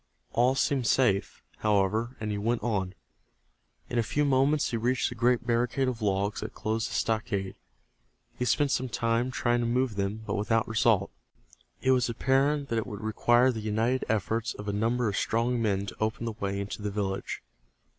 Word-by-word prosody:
All 125 +3 +3
seemed 135 -3 +1
safe, 105 -7 +1 0.2
however, 110 +4 +1
and 110 -1 -3
he 105 - -2
went 115 +3 0
on. 95 -5 -1 0.9
In 120 - -1
a - - +4
few 145 +6 0
moments 140 +2 +2
he 115 - 0
reached 125 +3 +1
the - - -6
great 120 +1 +2
barricade 125 +3 +1
of 125 -2 -3
logs 100 0 0
that 110 - -6
closed 110 0 -2
the - - -5
stockade. 110 -4 -1 0.8
He - - -3
spent 140 +4 +2
some 130 +1 0
time 115 +1 0
trying 120 -2 +1
to 120 - 0
move 125 -2 0
them, 100 +3 -2
but - - -3
without 115 +2 +1
result. 110 -3 +2 0.7
It 130 - +4
was 125 -2 +3
apparent 135 +4 +1
that 115 - +1
it 110 - -4
would 105 -3 -7
require 120 +3 +3
the 115 - -5
united 110 +4 0
efforts 110 +1 -1
of 105 - -8
a 100 - -1
number 115 +3 +1
of 100 - -1
strong 115 +1 0
men 100 -3 0
to - - -7
open 110 +1 -1
the 115 - -1
way 100 -2 -3
into 100 +1 -5
the 105 - -2
village. 100 -1 -3
115 Hz, 190 wpm, -28 LUFS, 105-125 Hz, 0.9 s, a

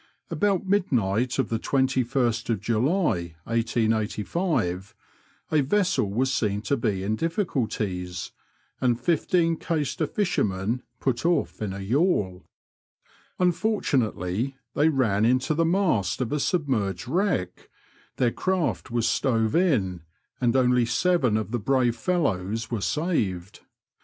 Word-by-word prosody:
About 200 -2 +1
midnight 125 - +1
of 135 -4 0
the 115 - -1
21st 125 -4 0
July, 115 - 0
1885, 110 - -1 0.6
a 155 -2 +4
vessel 180 - +1
was 130 +6 0
seen 105 -3 0
to 140 - +1
be 105 -7 -1
in 105 +2 0
difficuUies, 110 - -2 0.5
and 120 -2 +1
fifteen 165 +3 +1
Caister 155 -1 -1
fishermen 115 - -1 0.2
put 125 -3 -1
off 170 -7 0
in 105 -3 -2
a 100 +1 -6
yawl. 105 - 0 0.9
Unfortunately, 135 - 0 0.2
they 150 +2 +3
ran 115 -8 +1
into 130 +5 +2
the 165 +2 +2
mast 165 - +1
of 125 -3 -2
a 150 - 0
submerged 120 - -1
wreck, 160 - -1 0.5
their 120 -2 +2
craft 185 -3 -1
was 120 -1 0
stove 115 -3 +1
in, 110 - +1 0.4
and 120 -1 +1
only 125 -1 +4
seven 125 -3 +2
of 110 0 -3
the 120 - -1
brave 125 +1 +2
fellows 115 - -1
were 115 -4 -2
saved. 105 - -1
120 Hz, 120 wpm, -25 LUFS, 105-160 Hz, 0.9 s, a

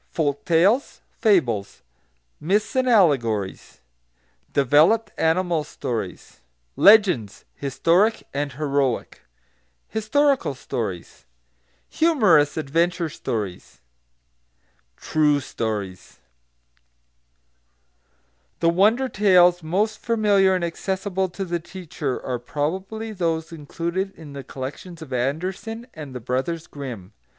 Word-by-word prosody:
Folk 145 -3 -2
Tales 190 - +2 0.2
Fables 125 - +1 0.6
Myths 205 - 0
and 260 -1 +2
Allegories 120 - +1 0.7
Developed 150 - +3
Animal 165 -1 +1
Stories 115 -9 -6 0.3
Legends: 190 - +4
Historic 170 - +1
and 140 0 -2
Heroic 140 -3 -1 0.7
Historical 265 - +1
Stories 95 - -6 0.6
Humorous 210 - +3
Adventure 165 +3 0
Stories 105 -10 -5 1.2
"True 150 -2 +2
Stories" 105 -8 -5 2.4
The 165 - +3
wonder 215 +9 +3
tales 180 -5 +4
most 205 +7 -1
familiar 205 -4 +3
and 180 - -2
accessible 190 +2 -2
to 195 +2 -5
the 175 -1 -2
teacher 170 -5 -5
are 125 -2 -2
probably 190 - -4
those 165 -4 -2
included 170 +5 -4
in 150 -3 -11
the 140 -1 -7
collections 155 +7 -8
of 135 -4 -9
Andersen 180 - -3
and 145 -5 -9
the - - -4
Brothers 130 +8 -2
Grimm. 120 -9 -8
165 Hz, 95 wpm, -23 LUFS, 135-195 Hz, 2.4 s, Legends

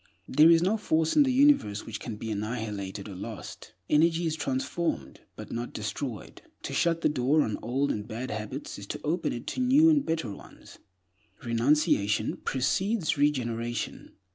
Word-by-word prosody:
There 155 +4 +6
is 165 0 +6
no 200 +5 +2
force 160 -6 +1
in 300 - +7
the 270 -2 +4
universe 255 - +3
which 110 -1 -6
can 115 -1 -6
be 110 +1 -5
annihilated 105 -2 -4
or 100 - -8
lost. 105 +4 -8
Energy 165 +3 +3
is 160 -1 0
transformed, 135 - -2 0.2
but - - -9
not 120 +1 -4
destroyed. 110 +2 -5 0.2
To - - -5
shut 165 -1 +1
the - - +3
door 145 +2 +2
on 110 - -3
old 135 +5 0
and 105 0 -4
bad 120 +3 -5
habits 105 -1 -5
is 100 - -9
to - - -5
open 165 +3 0
it 120 - -6
to - - -4
new 285 +6 +6
and 295 -3 +3
better 160 -9 -2
ones. - - -13 0.6
Renunciation 115 -4 +2
precedes 185 - 0
regeneration. 120 -5 -1
130 Hz, 165 wpm, -28 LUFS, 110-165 Hz, 0.6 s, in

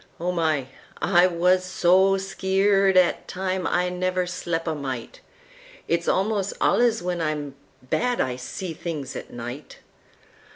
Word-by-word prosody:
Oh, 175 +2 -1
my! 160 -6 0 0.3
I 175 -1 +4
wuz 180 +1 +3
so 185 +1 +3
skeered 195 0 +2
'at 180 -1 +3
time 185 -1 -2
I 180 0 +1
never 185 0 -1
slep' 175 -2 -3
a 160 - 0
mite—It's 170 - -6
almost 200 0 +1
alluz 235 -5 +3
when 175 -1 -2
I'm 150 -3 -2 0.3
bad 245 - 0
I 125 -1 0
see 165 +8 -6
things 150 -5 -5
at - - -7
night! 120 +4 -8
180 Hz, 130 wpm, -24 LUFS, 160-190 Hz, 0.3 s, I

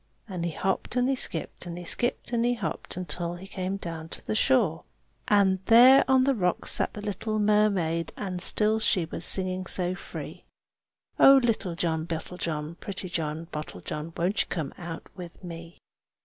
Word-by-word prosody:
And 180 -5 -4
he - - 0
hopped 190 +7 -2
and 250 0 +2
he 270 - +2
skipped, 175 -6 -1
and 170 0 -6
he 175 - -7
skipped 240 +6 -1
and 235 -1 +2
he 245 +1 +2
hopped, 230 - -4
Until 175 -1 -3
he 180 +2 -10
came 190 0 -3
down 165 -4 -6
to - - -9
the - - -1
shore. 215 - +2 0.4
And 195 -2 +4
there 250 +4 +8
on 265 -1 +5
the 275 +1 +3
rocks 180 -7 0
sat - - +2
the 210 - -7
little 215 +1 -2
mermaid, 200 -6 +2
And 185 -3 -4
still 215 +3 +3
she 190 -5 +1
was 160 - -6
singing 185 -1 -1
so 180 -1 0
free, 185 - -8 0.8
"Oh! 270 0 +9
little 215 -7 0
John 160 -1 -1
Bottlejohn, 165 -1 -4
pretty 190 -2 -5
John 160 -1 -3
Bottlejohn, 150 - -6
Won't 185 +5 +1
you - - -2
come 155 -5 -3
out 170 -2 -7
to 180 0 -10
me?" 170 0 -9
185 Hz, 175 wpm, -27 LUFS, 170-215 Hz, 0.8 s, Oh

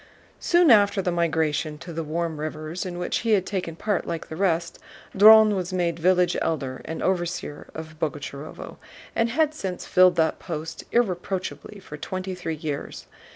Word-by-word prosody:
Soon 345 -4 +4
after 205 -2 +5
the 180 -2 0
migration 160 -2 0
to 170 +2 -9
the 165 +1 -3
"warm 160 0 -3
rivers," 155 +4 -4
in 175 -1 -6
which 175 - -1
he 230 -2 +1
had 190 -3 +2
taken 180 -5 -3
part 205 +2 -1
like 165 -1 -4
the 160 - -6
rest, 170 -2 0 0.4
Dron 215 +1 +8
was 185 -1 -3
made 170 -2 -1
village 180 +1 +3
Elder 135 -5 -2
and 160 - -5
overseer 175 -5 -2
of 155 -1 -8
Boguchárovo, 145 -1 -5 0.4
and 230 0 +2
had 310 +4 +1
since 190 -11 -5
filled 185 0 +5
that 160 -1 +1
post 165 -1 -6
irreproachably 190 -2 -2
for 150 -5 -10
twenty 185 +5 -5
three 175 -3 -4
years. 150 -2 -5
175 Hz, 165 wpm, -25 LUFS, 160-190 Hz, 0.4 s, Dron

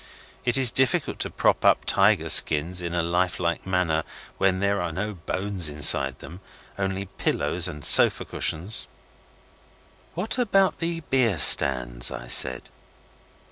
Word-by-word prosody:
It 120 +1 +1
is 130 -3 +4
difficult 130 -2 -2
to - - -5
prop - - -2
up - - +1
tiger - - 0
skins 85 +4 +2
in 85 0 -7
a 85 - -2
life 90 +1 -3
like 85 +1 -5
manner 90 -4 -2 0.4
when 95 -1 -1
there 100 0 -3
are 90 -1 -6
no 105 +6 -6
bones 95 0 -5
inside 70 -3 +1
them, 85 +3 -14 0.4
only 95 0 -5
pillows 95 - -2
and 75 -1 -7
sofa - - +8
cushions. 90 +7 -4 1.3
'What 215 +8 -4
about 195 -5 -1
the 165 0 -5
beer 125 - -2
stands?' 60 -5 +5
I - - -10
said. - - +2
90 Hz, 140 wpm, -22 LUFS, 80-105 Hz, 1.3 s, sofa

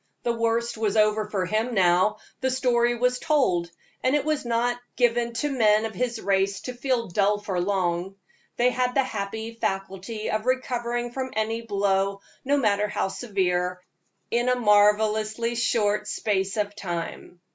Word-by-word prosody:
The 235 - +1
worst 230 0 0
was 215 -1 0
over 215 0 +2
for 195 -3 -1
him 220 +5 -1
now; 185 +2 +3 0.2
the 260 - 0
story 240 -2 +2
was 250 +1 +1
told, 185 - +1 0.3
and 260 +3 +2
it 295 -1 0
was 305 -4 -1
not 240 +1 0 0.2
given 240 -1 +1
to 285 +6 -1
men 215 -4 +3
of 220 - -4
his 235 +3 -2
race 195 0 0
to 250 - -5
feel 245 -1 -1
dull 200 +3 +2
for 195 -3 -2
long. 185 -1 -1 0.4
They 245 +1 +3
had 250 0 0
the 270 - +4
happy 220 -1 -4
faculty 195 0 -3
of 215 +2 -2
recovering 240 -2 -1
from 260 +1 -3
any 220 +1 -1
blow, 200 -2 0 0.2
no 285 +2 +2
matter 210 -5 +2
how 205 - -1
severe, 180 -4 -1 0.5
in 240 +2 +1
a 250 - +3
marvelously 215 +1 +3
short 210 -3 +1
space 195 -1 -1
of 205 -1 -1
time. 175 -2 -5
220 Hz, 160 wpm, -25 LUFS, 200-240 Hz, 0.5 s, the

